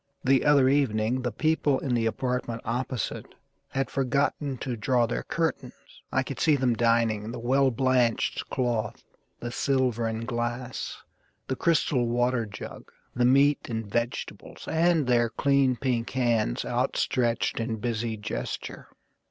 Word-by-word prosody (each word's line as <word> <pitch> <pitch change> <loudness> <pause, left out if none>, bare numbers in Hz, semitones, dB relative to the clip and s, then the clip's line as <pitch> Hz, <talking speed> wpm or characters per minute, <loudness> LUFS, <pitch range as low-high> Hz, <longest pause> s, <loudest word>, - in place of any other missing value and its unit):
The 135 0 +3
other 145 -3 +5
evening 130 -3 +1
the 125 -1 -2
people 155 +2 +1
in 130 -2 -2
the 115 -1 +2
apartment 120 0 -2
opposite 125 +1 -3 0.3
Had 135 0 -2
forgotten 140 +1 0
to 125 0 -4
draw 120 +2 +2
their 120 - -2
curtains. 160 -6 -2 0.4
I 130 - +1
could 135 -1 -6
see 155 -2 +4
them 130 -3 +2
dining: 115 -2 +1
the 120 - -6
well 130 +3 +2
blanched 125 -1 +1
cloth, 120 -4 -2 0.4
The 120 - -4
silver 125 -3 +1
and 110 +1 -3
glass, 120 +1 -4 0.4
the 130 - -1
crystal 135 -5 +2
water 120 -1 +1
jug, 100 - -9 0.2
The 120 0 +1
meat 140 +3 +4
and 115 -1 -3
vegetables; 120 +4 -4
and 165 -2 +2
their 120 -2 +3
clean 140 0 +2
pink 120 -2 -1
hands 120 - 0
Outstretched 120 -2 0
in 115 0 -2
busy 115 0 -2
gesture. 105 - -5
125 Hz, 140 wpm, -27 LUFS, 115-135 Hz, 0.4 s, other